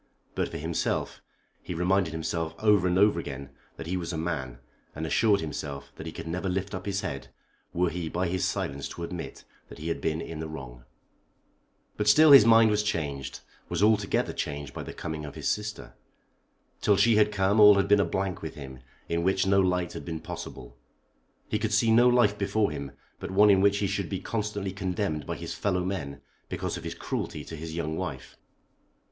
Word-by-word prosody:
But - - -1
for - - -6
himself, - - -2 0.4
he 90 - -6
reminded 90 0 +1
himself 80 0 -3
over 105 -4 +4
and 90 0 +1
over 100 -3 +4
again 70 -3 -7 0.3
that 80 - -7
he 90 +3 -2
was 85 -1 -4
a 85 - -3
man, 70 -7 -3 0.4
and 80 +2 -4
assured 105 +4 +3
himself 70 -2 -6
that - - -8
he - - -4
could - - -8
never 90 +3 -2
lift 95 +2 -2
up 95 +1 -5
his 100 0 -1
head 70 -2 -5 0.4
were 90 0 +1
he 85 -2 -4
by 90 +3 -1
his 90 +1 -1
silence 70 0 -2
to 85 - -7
admit 85 0 -6 0.3
that - - -11
he 80 +2 -5
had 85 - -2
been 80 0 -1
in 85 -1 -6
the 80 - -4
wrong. 65 -6 -9 1.1
But 105 - -1
still 150 +8 +7
his 135 -6 +10
mind 115 -1 +7
was 105 0 +2
changed, 75 -10 -3 0.3
was - - 0
altogether 110 0 +2
changed 70 -1 -4
by - - -5
the - - -7
coming 80 -1 -5
of 75 - -8
his - - -4
sister. 105 - -3 0.9
Till 100 -2 +4
she 110 +2 +4
had 105 0 +4
come 100 +1 +2
all 105 -1 +9
had 100 - +2
been 105 0 +5
a - - +4
blank 95 -2 -2
with 80 - -6
him, 65 -3 -9 0.3
in 85 0 0
which 95 +2 +2
no 95 0 +4
light 90 -1 0
had - - -7
been 80 -2 -5
possible. - - -8 0.7
He 105 - -1
could 110 -1 -1
see 110 +1 +4
no 120 +2 +6
life 120 -4 +3
before 105 0 +1
him 70 -2 -5 0.3
but - - -6
one 100 +2 +6
in 95 -1 +4
which 100 0 +4
he 100 - 0
should 100 -2 -2
be 95 - -3
constantly 105 -2 -3
condemned 90 -4 -2
by - - -2
his - - -6
fellow 90 -3 -1
men 70 -8 -4 0.3
because - - -3
of - - -8
his - - -4
cruelty - - -4
to 80 - -7
his 80 +1 -7
young 80 -2 -2
wife. 80 -8 -5
90 Hz, 210 wpm, -27 LUFS, 80-100 Hz, 1.1 s, his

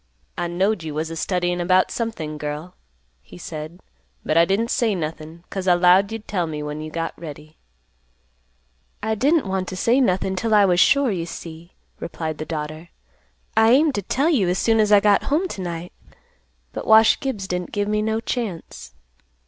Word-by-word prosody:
"I 175 - -2
knowed 185 +3 0
you 155 -2 -6
was 160 +1 -3
a - - -5
studyin' 175 +1 -1
about 185 +1 +3
something, 160 -10 -4
girl," 150 +4 -5 0.5
he - - -14
said, 160 0 -8 0.5
"but - - 0
I 165 0 +6
didn't 210 +6 0
say 225 -4 +1
nothin', 160 0 -6
'cause 190 -1 -4
I 180 - +6
'lowed 180 +3 +4
you'd 225 -1 -7
tell 180 -4 -1
me 150 -1 -5
when 150 +1 -5
you 155 - -6
got 165 +1 -3
ready." 155 -1 -10 1.4
"I 220 +1 0
didn't 285 +7 +2
want 190 -1 -2
to - - -5
say 235 +8 +2
nothing 190 -4 +1
'til 220 +3 +1
I 205 -1 +6
was 180 -2 +2
sure, 280 -1 +4
you 170 -3 -3
see," 165 +1 -9 0.3
replied 160 -2 -5
the 155 - -4
daughter. 155 +1 -5 0.7
"I 220 0 +5
aimed 295 +2 +4
to 205 - -2
tell 275 - 0
you 205 - +2
as 180 - 0
soon 225 -1 +2
as 210 -1 +3
I 205 -1 +7
got 205 -1 +3
home 320 +7 +1
to 195 - -6
night, 175 -1 -6 0.8
but - - -6
Wash 220 0 +6
Gibbs 220 -9 -4
didn't 180 -1 -3
give 205 -1 -1
me 210 0 0
no 220 +1 0
chance." 225 - -5
185 Hz, 190 wpm, -22 LUFS, 165-220 Hz, 1.4 s, I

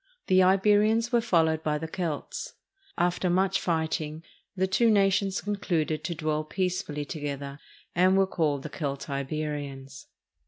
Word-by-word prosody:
The 185 0 +4
Iberians 210 +5 +4
were 240 -1 +3
followed 160 -8 +2
by 150 -1 0
the 160 +2 -5
Celts. 165 -3 -4 0.4
After 180 +1 +1
much 185 +2 +2
fight 160 -2 0
ing 155 +1 -7 0.3
the 190 0 +1
two 210 +5 +3
nations 195 -2 +2
concluded 175 -7 -1
to 170 - -2
dwell 155 -1 -1
peacefully 175 -3 -2
together, 140 -2 -5 0.3
and 185 +2 +4
were 195 - +5
called 150 -7 -1
the 155 - -7
Celtiberians. 140 -1 -4
165 Hz, 135 wpm, -27 LUFS, 150-190 Hz, 0.4 s, were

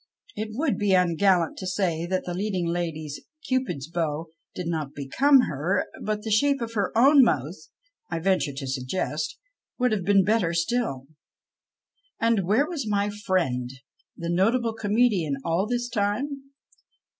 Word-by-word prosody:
It 215 0 -4
would 280 +3 0
be 205 -2 +3
ungallant 180 -1 +2
to 185 - -5
say 180 -3 -1
that 185 +1 -1
the 175 - -3
leading 190 -1 -1
lady's 165 -3 -3
" 310 0 -17
Cupid's 255 - -1
bow 165 -1 -2
" - - -49
did 180 - -4
not 155 -4 -3
become 265 - +4
her, 155 - -1 0.2
but 210 0 -2
the 220 - -4
shape 280 +6 +3
of 230 -1 -5
her 200 -4 0
own 275 +4 +7
mouth, 155 - -1 0.4
I - - -2
venture 180 -3 +1
to 135 0 -6
suggest, 145 +4 -3 0.4
would 250 -1 +2
have 210 -4 0
been 195 +1 +4
better 190 -4 +1
still. 165 - -1 1.1
And 225 -5 +2
where 235 +9 +3
was 285 -11 -4
my 205 0 +1
friend 185 - -1 0.5
the 170 0 -3
notable 225 +6 +2
comedian 210 - +1
all 170 +5 +1
this 245 +1 -1
time 245 +6 -2
195 Hz, 155 wpm, -25 LUFS, 165-230 Hz, 1.1 s, own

